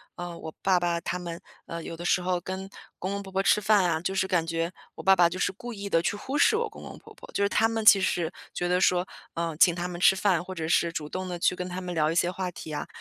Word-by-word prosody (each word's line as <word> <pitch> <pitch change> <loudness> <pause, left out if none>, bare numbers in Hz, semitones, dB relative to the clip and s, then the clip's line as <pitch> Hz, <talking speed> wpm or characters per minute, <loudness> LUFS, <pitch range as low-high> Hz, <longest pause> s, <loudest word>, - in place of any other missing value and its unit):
呃， 175 -1 -6
我 160 - -8
爸 190 -2 +3
爸 170 -1 0
他 180 - -3
们， 170 -1 -6 0.2
呃， 165 0 -6
有 165 - -7
的 175 - -7
时 180 - +3
候 180 0 0
跟 190 +2 -6 0.3
公 185 - -3
公 200 0 -3
婆 195 -1 -10
婆 195 +1 +1
吃 - - +4
饭 210 -1 +4
啊， 170 -3 +1
就 185 +3 -3
是 190 - +2
感 170 -3 +1
觉 165 +1 -1 0.2
我 - - -9
爸 195 - +6
爸 175 -2 +5
就 175 +2 -5
是 - - +1
故 240 +5 -8
意 200 -1 -6
地， 165 - +3
去 180 - -1
忽 265 +8 -4
视 360 - +5
我 455 0 0
公 430 - -12
公 - - -9
婆 - - -15
婆。 - - -14
就 200 - +1
是 200 - +2
他 225 - +3
们 225 -1 -2
其 210 -2 +9
实 175 -3 0 0.2
觉 175 - -2
得 180 0 +2
说， 180 -1 +3 0.3
呃， 165 -1 -2
请 175 +1 +5
他 175 0 -3
们 175 -1 -6
吃 185 +2 +6
饭， 190 -3 +2
或 185 +1 -8
者 160 -2 -3
是 170 0 +3
主 150 -2 -4
动 185 +2 -4
地 180 -1 -4
去 175 - +2
跟 180 0 -5
他 185 +1 -5
们 180 -1 -5
聊 155 -2 +2
一 165 - -1
些 175 +1 +2
话 185 -1 -3
题 160 -2 -9
啊， 150 - -4
180 Hz, 325 characters per minute, -27 LUFS, 170-195 Hz, 0.3 s, 其